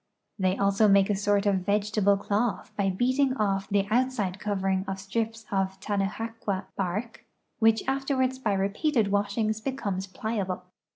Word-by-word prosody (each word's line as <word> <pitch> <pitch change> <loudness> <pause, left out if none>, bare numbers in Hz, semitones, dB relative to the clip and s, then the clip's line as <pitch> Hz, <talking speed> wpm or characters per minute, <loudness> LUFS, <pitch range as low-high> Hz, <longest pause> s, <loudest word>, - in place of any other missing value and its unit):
They 185 0 +1
also 200 +2 +3
make 200 0 +5
a - - +2
sort 205 +1 +1
of 200 -2 +3
vegetable 200 +1 +2
cloth 210 +3 -1
by 200 -1 +1
beating 260 +7 +1
otf 195 -4 0
the 200 -1 +1
out 255 +3 +3
side 205 -6 -3
covering 190 -2 0
of 195 0 -3
strips 225 +3 -3
of 190 -1 -1
Tanajaqua 205 0 -2
bark, 205 +5 -3 0.4
which 225 -1 +4
afterwards 265 -1 0
by 220 -6 0
repeated 205 +4 +1
washings 210 +2 0
becomes 200 -8 -3
pliable. 195 -2 -3
205 Hz, 150 wpm, -27 LUFS, 195-225 Hz, 0.4 s, make